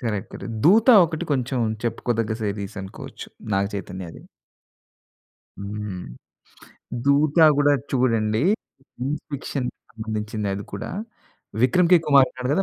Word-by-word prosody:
Correct. 105 -5 -3
Correct. - - -8 0.2
'దూత' 220 - +7
ఒకటి 165 +1 -3
కొంచెం, 130 -1 -1 0.3
చెప్పుకోదగ్గ 115 -1 -1
సీరీస్ 100 0 -4
అనుకోవచ్చు. 95 - -9 0.3
నాగ 100 +1 +2
చైతన్యది. 95 -3 -7 1.4
హ్మ్. 100 -1 -5 1.1
'దూత' 145 +3 +3 0.2
గూడా 145 0 +4 0.2
చూడండి. 115 -1 +1 0.5
సైన్స్ 140 +5 -3
ఫిక్షన్‌కి 135 -2 -4 0.2
సంబంధించిందె 110 -2 -3
అది 100 - -6
కూడా. 100 - -5 0.7
విక్రమ్‌ 170 +7 +3
కే 175 - +9
కుమార్ 140 -2 +6
ఉన్నాడు 125 0 -4
కదా! 195 - +2
120 Hz, 115 wpm, -23 LUFS, 105-140 Hz, 1.4 s, కే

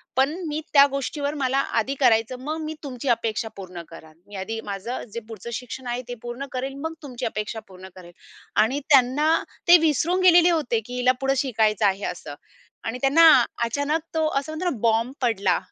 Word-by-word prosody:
पण 270 +4 +2
मी 300 0 -2
त्या 280 -1 +8
गोष्टीवर 285 +1 -3
मला 265 -2 0 0.2
आधी 265 +5 -1
करायचं 235 0 +2
मग 305 +4 -4
मी 310 0 -4
तुमची 265 -1 -6
अपेक्षा 225 -1 0
पूर्ण 185 -3 -8
करेल. 160 -1 -13
मी 205 - -11
आधी 210 +4 -4
माझं 205 +5 -5
जे 235 - -3
पुढचं 225 +1 -8
शिक्षण 250 +2 -6
आहे 240 +1 -2
ते 245 - -5
पूर्ण 240 +3 -6
करेल. 265 +1 -4
मग 320 0 -3
तुमची 255 -4 -6
अपेक्षा 215 +1 -3
पूर्ण 190 0 -12
करेल" 175 -2 -13 0.5
आणि 260 +6 -1
त्यांना 275 +2 +4 0.4
ते 350 +1 +9
विसरून 345 +5 +1
गेलेले 350 -1 +7
होते, 300 -9 +1
की 245 +3 -9
हिला 250 0 +3
पुढं 270 0 +2
शिकायचं 220 -5 +1
आहे 195 0 +1
असं 145 -4 -10 0.5
आणि 225 +2 -3
त्यांना 285 +5 +5 0.4
अचानक 285 +6 -1
तो 315 -1 +1
असं 300 +3 -8
म्हणतो 355 +3 -1
ना 270 - -4
बॉम्ब 230 +2 +1
पडला. 200 -6 +1
250 Hz, 185 wpm, -24 LUFS, 220-285 Hz, 0.5 s, ते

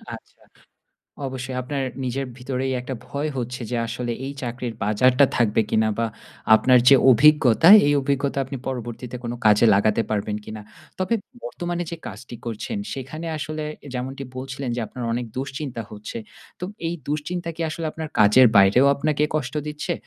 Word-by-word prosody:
আচ্ছা। - - -18 0.9
অবশ্যই 130 0 -5
আপনার 140 +2 -3 0.2
নিজের 135 +2 -2
ভিতরেই 130 +1 -2
একটা 130 +1 -5
ভয় 140 +4 -3
হচ্ছে 125 +1 -4
যে - - 0
আসলে 120 0 -3
এই 140 - -5
চাকরির 120 -1 -4
বাজারটা 125 +6 +4
থাকবে 115 -2 +3
কিনা? 110 0 +2
বা 115 - +1 0.5
আপনার 125 +2 +5
যে 140 - +9
অভিজ্ঞতা, 150 +2 +6 0.2
এই 145 - +3
অভিজ্ঞতা 140 0 -1
আপনি 135 +1 -6
পরবর্তীতে 125 -1 -5
কোনো 120 0 -4
কাজে 105 +2 +6
লাগাতে 105 +3 +3
পারবেন 105 0 -1
কিনা? 110 -1 -7 0.4
তবে 185 +4 0 0.3
বর্তমানে 175 0 -4
যে - - -3
কাজটি 115 +4 -9
করছেন, 120 - -4 0.2
সেখানে 135 +5 -6
আসলে 155 +1 -4 0.3
যেমনটি 130 +2 -4
বলছিলেন 135 0 -5
যে 120 - -2
আপনার 125 +3 -7
অনেক 120 +1 -2
দুশ্চিন্তা 135 -2 -4
হচ্ছে। 105 +2 -7 0.4
তো - - -6 0.2
এই 170 - -2
দুশ্চিন্তা 165 +4 -3
কি 170 - -6
আসলে 160 +1 -5
আপনার 160 0 -6
কাজের 110 +5 +7
বাইরেও 100 +7 +6
আপনাকে 150 +1 0
কষ্ট 135 -3 -2
দিচ্ছে? 150 +4 -3
130 Hz, 160 wpm, -23 LUFS, 120-145 Hz, 0.9 s, যে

